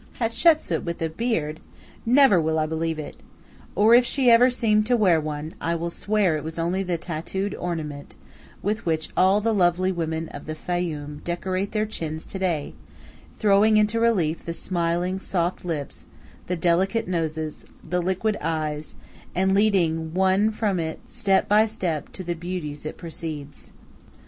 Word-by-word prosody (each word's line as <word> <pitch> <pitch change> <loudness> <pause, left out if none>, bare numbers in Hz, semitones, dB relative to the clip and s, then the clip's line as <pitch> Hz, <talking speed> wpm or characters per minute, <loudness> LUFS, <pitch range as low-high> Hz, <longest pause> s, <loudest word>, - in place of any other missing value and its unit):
Hatshepsu 305 +8 +3
with 170 -1 -4
a 160 - 0
beard! 160 -6 -2 0.5
Never 250 -7 +6
will 160 0 0
I 155 - +2
believe 160 +1 -2
it. 155 - -7 0.6
Or 215 +3 +5
if 245 +1 +8
she 250 0 +3
ever 240 +2 +7
seemed 215 -4 +2
to 245 0 +3
wear 180 -7 +4
one, 150 +1 -5
I 170 +1 0
will 170 +1 -3
swear 200 -3 +1
it 150 - -6
was 160 +1 -6
only 175 +3 0
the 180 -3 -1
tattooed 180 +4 -4
ornament 155 -5 -5 0.5
with 210 +2 -1
which 160 -2 -1
all 190 +3 +4
the 225 +1 +1
lovely 185 -1 +2
women 165 -2 -2
of 145 - -9
the 155 - -4
Fayum 155 -4 -4
decorate 185 +3 -2
their 215 0 0
chins 160 -7 -5
to 190 - -7
day, 170 -6 -1 0.6
throwing 210 +1 +4
into 215 +2 +2
relief 180 -9 +1
the 170 - -4
smiling, 175 +1 -1
soft 175 -2 -2
lips, 160 -5 -5 0.4
the 180 - -1
delicate 180 +6 +1
noses, 160 -3 -3 0.2
the 180 0 0
liquid 190 +4 0
eyes, 155 -2 -3 0.4
and 190 +2 +2
leading 170 -6 +2
one 190 +3 +3
from 210 -4 -1
it 160 -1 -3
step 195 -1 +1
by 215 +2 +5
step 180 -9 -3
to 185 - -6
the 175 0 -2
beauties 165 -4 -5
it - - -7
precedes. 155 -4 -7
175 Hz, 165 wpm, -24 LUFS, 160-205 Hz, 0.6 s, if